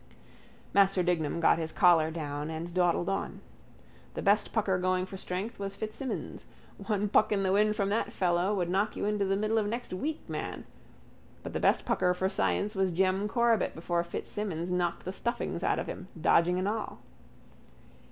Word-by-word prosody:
Master 195 -2 +4
Dignam 170 -3 0
got 165 - +4
his 160 -1 -3
collar 165 -3 +5
down 150 -2 -4
and 165 +2 -5
dawdled 175 -1 +2
on. 195 - -2 0.8
The - - -4
best 205 +1 +3
pucker 195 -4 +1
going 185 0 +1
for 190 - -9
strength 190 +5 -5
was 200 0 -4
Fitzsimons. 220 +5 -5 0.4
One 210 -2 +1
puck 210 - +3
in 200 -2 +1
the 190 - +1
wind 210 +2 +3
from 200 -2 0
that 215 +3 0
fellow 180 +1 +1
would 180 -3 0
knock 195 +4 0
you - - -2
into 210 -1 +1
the 195 0 +1
middle 215 +2 +1
of 210 - -1
next 235 -1 -4
week, 300 +12 -4
man. - - -5 0.8
But - - -6
the - - -1
best - - +2
pucker 180 -1 +2
for 190 +1 0
science 95 - 0
was 190 -2 +1
Jem 190 +3 +1
Corbet 235 0 +2
before 170 +1 -1
Fitzsimons 175 0 -4
knocked 175 -1 -1
the 185 - -4
stuffings 235 -5 -3
out - - +2
of - - -2
him, 185 - -7
dodging 170 +3 +3
and 185 +1 0
all. 215 +1 -3
190 Hz, 180 wpm, -30 LUFS, 175-210 Hz, 0.8 s, collar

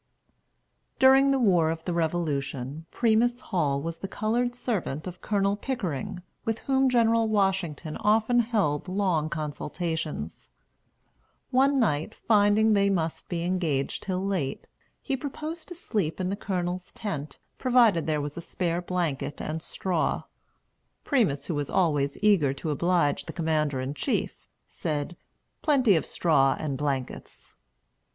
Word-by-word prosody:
During 270 +1 +6
the 275 - +3
war 180 -10 +3
of 165 0 -4
the 180 - -1
Revolution, 155 -3 -2
Primus 240 +1 +2
Hall 150 - 0
was 165 0 -4
the 195 - -4
colored 240 +5 -1
servant 205 - -3
of 180 -1 -8
Colonel 200 -1 +1
Pickering, 185 - -4 0.2
with 225 -1 -1
whom 265 +1 +2
General 230 -2 +3
Washington 190 -7 0
often 220 +3 +3
held 210 -11 0
long 180 -5 0
consultations. 155 - -4 1.0
One 270 +2 +4
night, 165 - 0
finding 215 0 +4
they 200 -1 +3
must 165 -4 -2
be 170 -2 -2
engaged 170 -7 -1
till 185 0 -2
late, 180 -9 -2 0.4
he 275 - -1
proposed 305 +5 -6
to 355 - -8
sleep 205 - -2
in 185 0 -1
the - - -1
Colonel's 180 -3 -3
tent, 155 -9 -5 0.2
provided 235 - +4
there 155 -2 +1
was 145 0 -5
a 170 - -5
spare 175 0 -2
blanket 170 -6 -2
and 160 +1 -4
straw. 180 0 -1 0.8
Primus, 180 - +1
who - - -2
was 145 -2 -2
always 145 -6 +1
eager 180 -11 +4
to 150 +3 -4
oblige 170 0 +1
the - - -7
Commander 155 -5 0
in 130 +2 -3
Chief, 145 - -2 0.2
said, 150 +3 -3 0.5
"Plenty 260 - +4
of 160 - 0
straw 135 -6 +3
and 150 -3 -3
blankets." 135 -2 -4
180 Hz, 140 wpm, -27 LUFS, 155-220 Hz, 1.0 s, During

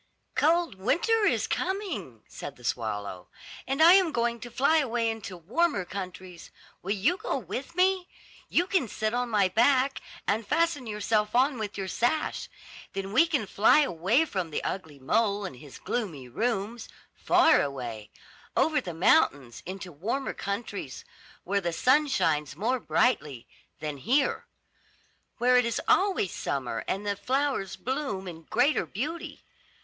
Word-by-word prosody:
"Cold 330 +3 +2
winter 380 - +2
is - - +2
coming," 320 - -3
said 140 - -8
the 125 - -18
swallow, 105 -6 -3 0.4
"and 275 +4 +2
I 340 +2 +9
am 375 -4 +5
going 235 -2 0
to 240 - -8
fly 280 +7 +3
away 240 -5 +1
into 210 -4 -7
warmer 220 - 0
countries. 185 -2 -8 0.3
Will 200 +3 -1
you 265 - +1
go 470 +5 -2
with 275 +6 -6
me? 370 0 +2 0.4
You 350 - +2
can 370 -9 +1
sit 215 +1 -2
on 245 0 -1
my 205 -4 +3
back, 260 +7 +2 0.2
and 210 +1 0
fasten 330 -7 +1
yourself 210 0 0
on 260 0 +3
with 205 -2 -4
your 195 -1 -3
sash. 245 +10 -1 0.4
Then 195 0 -4
we 330 +8 +5
can 290 -9 0
fly 210 +9 +4
away 220 - +2
from 185 - -3
the 150 - -3
ugly 160 -6 -4
mole 205 +8 +1
and 175 -9 -7
his 140 +1 -12
gloomy 165 - -4
rooms, 225 - -2 0.2
far 325 -2 +4
away, 120 -6 -5 0.5
over 310 -2 +3
the 175 -8 -6
mountains, 140 - +2
into 185 -1 -6
warmer 220 - -3
countries, 200 - -5 0.4
where 200 +2 0
the 170 -2 -1
sun 275 - +3
shines 150 - 0
more 235 - 0
brightly 150 - 0 0.3
than 150 -2 -4
here; 265 - +1 0.9
where 250 +1 +4
it 250 - +5
is 235 -1 -1
always 380 - +3
summer, 125 -5 -3
and 195 +2 -2
the 205 -1 0
flowers 260 -5 -1
bloom 255 -8 -3
in 165 -2 -8
greater 260 +6 +2
beauty. 300 - -5
220 Hz, 155 wpm, -28 LUFS, 180-280 Hz, 0.9 s, I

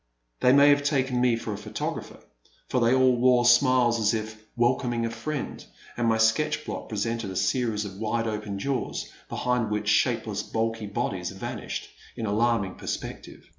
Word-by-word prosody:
They 125 - +5
may 140 +2 +7
have 145 0 +5
taken 135 -3 0
me 125 -2 +3
for 115 -2 -4
a 100 - -6
photographer, - - -5 0.5
for 125 - +1
they 115 0 +4
all 130 -1 +4
wore 125 0 +4
smiles 120 -1 +4
as 110 +1 +2
if 110 0 -6
' - - -37
* - - -42
welcoming 120 -1 +1
a 115 - -2
friend, 130 +5 -5 0.3
and 120 -1 0
my 110 0 +3
sketch 130 +8 +2
block - - -6
presented 115 0 -2
a 95 - -6
series 105 +2 0
of 95 -1 -8
wide 115 +1 -1
open 105 -2 -3
jaws, 135 +5 -3 0.2
behind 125 -3 0
which 105 0 -1
shapeless - - +1
bulky 115 -1 -2
bodies 100 - -2
vanished - - -5 0.3
in 115 - -4
alarming 105 -2 +1
perspective. - - -6
115 Hz, 175 wpm, -26 LUFS, 110-125 Hz, 0.5 s, may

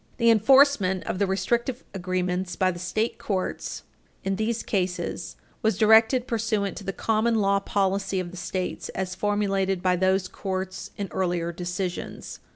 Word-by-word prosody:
The 235 -1 +5
enforcement 225 -5 +5
of 185 - -3
the 200 - +2
restrictive 235 +6 -1
agreements 185 -1 -2
by 185 -1 +2
the 175 - -8
state 215 +6 -1
courts 190 -3 -3 0.4
in 195 0 0
these 220 +2 -1
cases 185 -3 -2 0.3
was 220 -5 +1
directed 225 +4 +5
pursuant 220 -4 -1
to - - -7
the 195 - -2
common 225 +3 +1
law 200 -2 +3
policy 195 -1 0
of 175 -1 -4
the - - -10
States 180 +1 -3
as 185 -1 -2
formulated 195 -2 0
by 180 -1 +3
those 185 +1 +2
courts 190 -1 -4
in 200 - -3
earlier 175 -2 -1
decisions. 180 +1 -5
195 Hz, 155 wpm, -26 LUFS, 185-215 Hz, 0.4 s, The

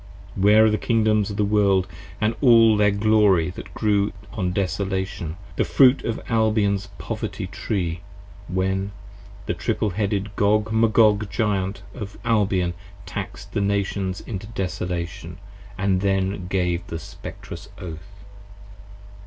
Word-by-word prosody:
Where 105 +3 +5
are - - +5
the 105 - 0
Kingdoms 110 -3 +2
of 100 - -5
the 105 - +2
World 100 -2 +3 0.3
& 110 +1 -1
all 115 -4 +7
their 105 0 +4
glory 100 -4 +3
that - - -10
grew 105 -2 +1 0.2
on 90 -4 -1
Desolation, 95 -2 -2 0.2
The - - +3
Fruit 130 -1 +5
of 115 - -2
Albion's 105 -3 +1
Poverty - - -4
Tree, 85 -5 -3 0.5
when 95 +2 -1 0.5
the - - -1
Triple 105 - -1
Headed 100 +1 -2
Gog 105 +2 +2
Magog 110 -2 +4
Giant 100 -3 -1
Of 100 -4 -7
Albion 100 -6 +2 0.3
Taxed 85 - -6
the 105 - 0
Nations 100 -1 -1
into 105 -2 -6
Desolation, 90 -4 -4 0.2
& - - -18
then 95 0 0
gave 90 -1 -1
the 85 - -4
Spectrous 80 - -9
Oath? 90 +4 -10
100 Hz, 130 wpm, -23 LUFS, 95-105 Hz, 0.5 s, all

